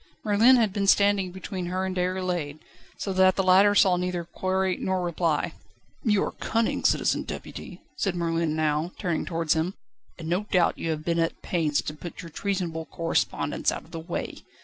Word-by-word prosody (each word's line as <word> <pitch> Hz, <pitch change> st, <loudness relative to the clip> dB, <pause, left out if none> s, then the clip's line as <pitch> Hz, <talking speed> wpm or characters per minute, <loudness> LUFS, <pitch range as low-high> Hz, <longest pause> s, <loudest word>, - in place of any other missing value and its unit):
Merlin 220 Hz, +5 st, +5 dB
had 220 Hz, -6 st, +2 dB
been 200 Hz, -1 st, -1 dB
standing 200 Hz, -2 st, +4 dB
between 185 Hz, 0 st, -5 dB
her 185 Hz, +1 st, -1 dB
and 190 Hz, 0 st, -3 dB
Déroulède, 180 Hz, -5 st, -1 dB, 0.4 s
so 195 Hz, -, -3 dB
that 185 Hz, 0 st, +5 dB
the 195 Hz, -, +1 dB
latter 195 Hz, +2 st, +5 dB
saw 185 Hz, -3 st, +5 dB
neither 180 Hz, -1 st, -2 dB
query 185 Hz, +2 st, -1 dB
nor 185 Hz, -1 st, -1 dB
reply. 170 Hz, -3 st, 0 dB, 0.5 s
"You 210 Hz, -4 st, +3 dB
are -, -, -2 dB
cunning, 230 Hz, 0 st, -1 dB
Citizen -, -, +2 dB
Deputy," -, -, -8 dB
said 195 Hz, -3 st, 0 dB
Merlin 165 Hz, -2 st, 0 dB
now, 155 Hz, +2 st, 0 dB
turning 175 Hz, -5 st, -1 dB
towards 165 Hz, -2 st, +1 dB
him, 165 Hz, +4 st, -1 dB, 0.4 s
"and 160 Hz, -, -7 dB
no 180 Hz, +5 st, 0 dB
doubt 180 Hz, -5 st, +2 dB
you 165 Hz, -, -2 dB
have 155 Hz, -1 st, -3 dB
been 170 Hz, 0 st, +1 dB
at 165 Hz, 0 st, -1 dB
pains 155 Hz, -5 st, 0 dB
to 150 Hz, -, -4 dB
put 170 Hz, +4 st, -9 dB
your 165 Hz, -, -10 dB
treasonable 175 Hz, -4 st, -2 dB
correspondence 165 Hz, 0 st, -1 dB
out -, -, -5 dB
of -, -, -20 dB
the 165 Hz, -, -5 dB
way. 170 Hz, +2 st, -5 dB
180 Hz, 185 wpm, -26 LUFS, 165-190 Hz, 0.5 s, Merlin